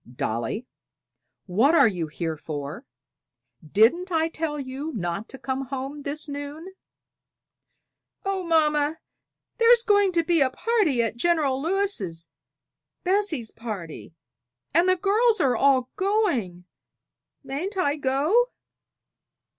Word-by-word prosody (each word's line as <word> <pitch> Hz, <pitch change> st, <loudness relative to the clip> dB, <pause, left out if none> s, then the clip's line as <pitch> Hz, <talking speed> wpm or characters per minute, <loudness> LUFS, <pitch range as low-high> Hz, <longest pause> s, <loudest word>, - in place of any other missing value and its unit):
"Dolly! 120 Hz, -, -3 dB, 0.8 s
what 230 Hz, -, +3 dB
are 280 Hz, -6 st, +7 dB
you 175 Hz, -6 st, -2 dB
here 160 Hz, +1 st, -4 dB
for? 155 Hz, -, -7 dB, 0.8 s
Didn't 230 Hz, -, +3 dB
I 325 Hz, -1 st, +1 dB
tell 310 Hz, -2 st, -3 dB
you 275 Hz, +3 st, -5 dB
not 185 Hz, +2 st, -3 dB
to 265 Hz, -, -9 dB
come 265 Hz, 0 st, -3 dB
home 270 Hz, +2 st, -5 dB
this 295 Hz, +2 st, -3 dB
noon?" 290 Hz, +5 st, -7 dB, 1.5 s
"Oh, 390 Hz, -1 st, -1 dB
mamma, 305 Hz, -2 st, +2 dB, 0.6 s
there's 470 Hz, 0 st, +6 dB
going 405 Hz, -3 st, +4 dB
to 335 Hz, -1 st, +2 dB
be 335 Hz, -2 st, +2 dB
a 265 Hz, -, +4 dB
party 340 Hz, -, +1 dB
at 230 Hz, 0 st, -3 dB
General 285 Hz, -3 st, +1 dB
Lewis' 310 Hz, -, -2 dB, 0.8 s
Bessie's 365 Hz, -, 0 dB
party 190 Hz, -8 st, -7 dB, 0.6 s
and 340 Hz, +4 st, +4 dB
the 370 Hz, -, +5 dB
girls 425 Hz, +4 st, +2 dB
are 265 Hz, -6 st, +2 dB
all 260 Hz, 0 st, +3 dB
going; 345 Hz, -, 0 dB, 0.8 s
mayn't 340 Hz, +10 st, -4 dB
I 290 Hz, -6 st, +1 dB
go?" 305 Hz, -, +2 dB
285 Hz, 115 wpm, -25 LUFS, 230-355 Hz, 1.5 s, are